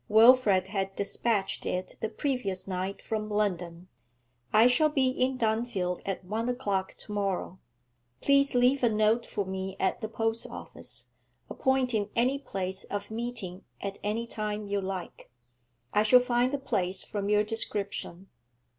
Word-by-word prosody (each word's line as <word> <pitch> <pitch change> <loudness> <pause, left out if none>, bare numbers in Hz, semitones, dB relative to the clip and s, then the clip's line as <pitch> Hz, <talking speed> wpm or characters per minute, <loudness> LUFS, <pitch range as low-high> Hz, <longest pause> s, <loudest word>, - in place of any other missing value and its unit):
Wilfrid 220 -4 +6
had 195 -1 -2
despatched 205 0 0
it 185 0 -2
the 220 - -2
previous 215 -7 -2
night 190 +1 -3
from 215 -1 -3
London. 180 -4 -1 0.6
'I 220 +2 +6
shall 280 +5 +5
be 270 -3 +2
in 255 0 0
Dunfield 220 -6 0
at 190 -1 -3
one 220 +5 -2
o'clock 200 -7 -1
to - - -9
morrow. 195 -2 -2 0.6
Please 280 -1 +3
leave 250 +3 +4
a 240 - +5
note 215 +2 +2
for 205 -2 -2
me 190 0 -4
at 190 - 0
the 220 - -3
post 225 0 -1
office, 120 0 -8 0.4
appointing 250 -6 +1
any 255 +4 +2
place 190 -7 -4
of 205 +1 -5
meeting 225 -5 -4 0.2
at 200 0 -5
any 215 +3 -1
time 215 -2 -3
you 200 0 -1
like. 190 -2 -6 0.6
I 210 - +4
shall 215 +4 +7
find 245 0 +1
the 285 - 0
place 190 -8 0
from 205 -1 -3
your 210 0 +4
description.' 200 -4 -1
210 Hz, 150 wpm, -29 LUFS, 190-240 Hz, 0.6 s, shall